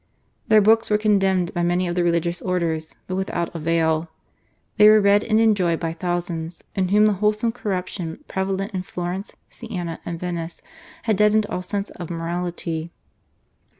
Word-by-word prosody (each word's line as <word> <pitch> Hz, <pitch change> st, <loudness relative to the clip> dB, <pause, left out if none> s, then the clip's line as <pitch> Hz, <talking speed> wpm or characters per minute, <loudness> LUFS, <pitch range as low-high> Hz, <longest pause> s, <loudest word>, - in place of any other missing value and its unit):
Their 215 Hz, -1 st, +6 dB
books 225 Hz, +2 st, +4 dB
were 210 Hz, -, +4 dB
condemned 195 Hz, -4 st, +2 dB
by 175 Hz, -, -1 dB
many 175 Hz, +1 st, +1 dB
of 175 Hz, -, -1 dB
the 175 Hz, 0 st, +1 dB
religious 170 Hz, 0 st, 0 dB
orders, 165 Hz, -4 st, -2 dB
but 185 Hz, -, -5 dB
without 185 Hz, -3 st, -2 dB
avail. 165 Hz, 0 st, 0 dB, 0.7 s
They 210 Hz, 0 st, +8 dB
were 215 Hz, 0 st, +7 dB
read 205 Hz, 0 st, +4 dB
and 215 Hz, -1 st, +2 dB
enjoyed 195 Hz, -7 st, +3 dB
by 165 Hz, -1 st, -2 dB
thousands, 170 Hz, -1 st, -3 dB
in 190 Hz, -1 st, 0 dB
whom 210 Hz, +3 st, +4 dB
the 215 Hz, -, +4 dB
wholesale 215 Hz, +2 st, +2 dB
corruption 185 Hz, -6 st, -4 dB
prevalent 195 Hz, +2 st, -2 dB
in 185 Hz, -, -2 dB
Florence, 180 Hz, +2 st, -5 dB
Siena, 180 Hz, -8 st, -6 dB
and 170 Hz, -1 st, -5 dB
Venice, 170 Hz, -1 st, -5 dB, 0.4 s
had 220 Hz, -4 st, +1 dB
deadened 210 Hz, +1 st, +4 dB
all 180 Hz, -, -2 dB
sense 200 Hz, +2 st, -3 dB
of 175 Hz, -, -8 dB
morality. 170 Hz, -1 st, -3 dB
180 Hz, 160 wpm, -22 LUFS, 170-205 Hz, 0.7 s, They